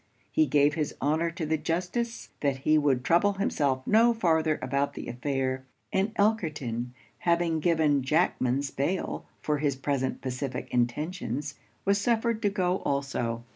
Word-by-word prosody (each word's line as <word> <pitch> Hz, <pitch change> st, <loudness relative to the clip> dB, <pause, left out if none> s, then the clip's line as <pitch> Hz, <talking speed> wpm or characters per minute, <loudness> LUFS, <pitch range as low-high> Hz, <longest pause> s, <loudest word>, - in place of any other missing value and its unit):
He 315 Hz, -1 st, +3 dB
gave 145 Hz, 0 st, +4 dB
his 150 Hz, -2 st, -2 dB
honour 155 Hz, +4 st, +1 dB
to 165 Hz, -1 st, -4 dB
the 160 Hz, 0 st, 0 dB
justice 185 Hz, +9 st, -2 dB
that 140 Hz, -2 st, 0 dB
he 155 Hz, -, +5 dB
would 140 Hz, -4 st, +2 dB
trouble 175 Hz, +8 st, +3 dB
himself 140 Hz, -9 st, 0 dB
no 230 Hz, +2 st, +5 dB
farther 160 Hz, -6 st, +2 dB
about 140 Hz, +1 st, -1 dB
the -, -, -6 dB
affair; 130 Hz, +1 st, -2 dB, 0.3 s
and 195 Hz, +3 st, +1 dB
Elkerton 155 Hz, -, 0 dB, 0.3 s
having 170 Hz, -2 st, +1 dB
given 155 Hz, -3 st, +3 dB
Jackman's 140 Hz, -2 st, +1 dB
bail 170 Hz, +8 st, -2 dB, 0.2 s
for 150 Hz, -1 st, 0 dB
his 145 Hz, -2 st, +1 dB
present 135 Hz, -1 st, -1 dB
pacific 130 Hz, 0 st, -4 dB
intentions, 140 Hz, +2 st, -1 dB, 0.3 s
was 200 Hz, +1 st, +3 dB
suffered 230 Hz, 0 st, +1 dB
to 205 Hz, -, +2 dB
go 185 Hz, -2 st, +1 dB
also. 130 Hz, -5 st, -2 dB
150 Hz, 145 wpm, -28 LUFS, 135-180 Hz, 0.3 s, he